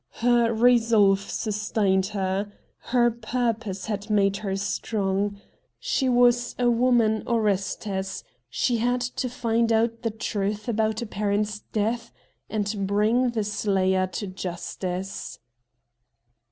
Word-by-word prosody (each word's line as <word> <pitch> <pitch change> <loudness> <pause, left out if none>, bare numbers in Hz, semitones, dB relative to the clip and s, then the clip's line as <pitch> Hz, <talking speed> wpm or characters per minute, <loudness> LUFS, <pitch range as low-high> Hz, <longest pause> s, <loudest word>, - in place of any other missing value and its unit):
Her 240 -1 +4
resolve 225 -4 +4
sustained 205 -2 0
her. 200 0 -2 0.3
Her 240 -1 +2
pur' 235 +1 -1
pose 205 -4 -7
had 210 0 -4
made 200 -1 +2
her 195 -2 -3
strong. 200 0 -1 0.4
She 275 - 0
was 245 0 +3
a 245 -1 +3
woman 235 -2 +3
Orestes; 200 -3 -1 0.3
she 235 - 0
had 245 +2 +1
to 250 +1 -2
find 230 -1 0
out 230 +1 +1
the 230 - 0
truth 210 -1 -3
about 220 0 0
a - - -4
parent's 210 0 -1
death 230 +2 -1 0.4
and 205 -2 -2
bring 220 +5 +2
the 225 -3 -1
slayer 190 -2 +1
to 205 - -5
justice. 185 0 -5
215 Hz, 120 wpm, -25 LUFS, 200-235 Hz, 0.4 s, Her